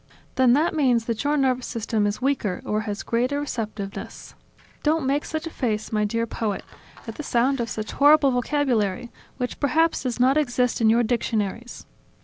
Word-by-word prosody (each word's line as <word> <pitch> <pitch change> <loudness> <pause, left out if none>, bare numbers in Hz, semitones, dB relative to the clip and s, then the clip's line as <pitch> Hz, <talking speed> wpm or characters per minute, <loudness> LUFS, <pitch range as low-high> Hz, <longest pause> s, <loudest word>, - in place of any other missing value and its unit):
"Then 255 -2 +4
that 305 +6 +2
means 250 -7 +2
that 230 0 -2
your 295 +1 +1
nervous 255 -2 +1
system 220 -2 -1
is 205 - -2
weaker 255 -9 -1
or 215 +1 0
has 205 0 -4
greater 250 +5 0
receptiveness... 215 -8 -6 0.5
Don't 310 -1 +1
make 280 +2 +1
such 315 0 -4
a 330 - -5
face, 220 -7 -2
my 210 -1 +1
dear 230 +2 -1
poet, 215 -3 -3 0.4
at 225 - -5
the - - -4
sound 270 0 +1
of 230 - -3
such 215 -1 -4
of - - -11
horrible 290 -1 +6
vocabulary, 245 -4 0 0.3
which 250 -1 -4
perhaps 320 +4 +2
does 250 -2 -3
not 260 +3 +4
exist 250 -5 +1
in 220 - +5
your 235 +2 +4
dictionaries. 230 -1 -2
245 Hz, 180 wpm, -24 LUFS, 220-280 Hz, 0.5 s, horrible